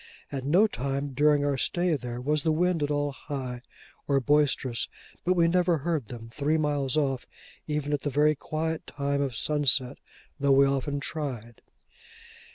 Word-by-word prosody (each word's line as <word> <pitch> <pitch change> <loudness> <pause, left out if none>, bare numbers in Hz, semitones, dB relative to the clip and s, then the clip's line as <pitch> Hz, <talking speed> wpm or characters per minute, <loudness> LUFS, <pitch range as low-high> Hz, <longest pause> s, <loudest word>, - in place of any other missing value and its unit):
At 135 -2 -4
no 170 +10 +4
time 140 - -2
during 145 +1 +3
our 140 -2 0
stay 175 +2 +1
there, 125 -3 -5
was 150 +4 0
the 160 - +1
wind 175 +1 +1
at 145 - 0
all 145 -1 0
high 130 -3 -6 0.5
or 140 -1 +3
boisterous, 135 -3 +1 0.4
but 185 +1 +2
we 170 -1 +4
never 175 0 +3
heard 155 -5 -2
them, 115 -1 -8
three 150 +2 +1
miles 145 -2 0
off, 135 -4 0 0.4
even 150 -1 -1
at 145 - 0
the 145 - -1
very 150 +2 +3
quiet 155 +2 -3
time 140 0 -1
of 135 -4 -2
sunset, 140 -1 +1 0.4
though 140 0 +4
we 140 +1 +6
often 140 +1 -1
tried. 130 -6 -5
145 Hz, 165 wpm, -27 LUFS, 135-155 Hz, 0.5 s, we